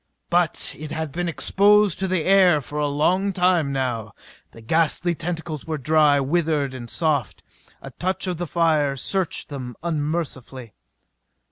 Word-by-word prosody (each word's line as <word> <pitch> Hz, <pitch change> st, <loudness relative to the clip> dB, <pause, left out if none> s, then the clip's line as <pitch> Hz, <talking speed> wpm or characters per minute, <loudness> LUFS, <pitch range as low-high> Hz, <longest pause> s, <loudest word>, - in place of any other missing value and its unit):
But 175 Hz, -2 st, +1 dB
it 155 Hz, 0 st, -7 dB
had 160 Hz, -2 st, -4 dB
been 175 Hz, +3 st, -2 dB
exposed 205 Hz, +3 st, +3 dB
to 190 Hz, -, 0 dB
the 185 Hz, -3 st, 0 dB
air 185 Hz, -4 st, +5 dB
for 145 Hz, +2 st, -6 dB
a 150 Hz, -, +1 dB
long 180 Hz, +8 st, +1 dB
time 180 Hz, -5 st, +2 dB
now. 120 Hz, -6 st, -3 dB, 0.4 s
The -, -, -14 dB
ghastly 165 Hz, +7 st, +1 dB
tentacles 165 Hz, -2 st, -5 dB
were 160 Hz, -1 st, -2 dB
dry; 150 Hz, 0 st, +3 dB
withered 150 Hz, -1 st, 0 dB
and 120 Hz, -2 st, -8 dB
soft. 150 Hz, -4 st, -1 dB, 0.4 s
A -, -, -8 dB
touch 185 Hz, +2 st, -2 dB
of 180 Hz, -2 st, -2 dB
the 175 Hz, +1 st, -4 dB
fire 155 Hz, -4 st, +1 dB
seared 185 Hz, +6 st, -1 dB
them 130 Hz, -4 st, -7 dB
unmercifully. 145 Hz, -, -4 dB
155 Hz, 150 wpm, -23 LUFS, 140-175 Hz, 0.4 s, air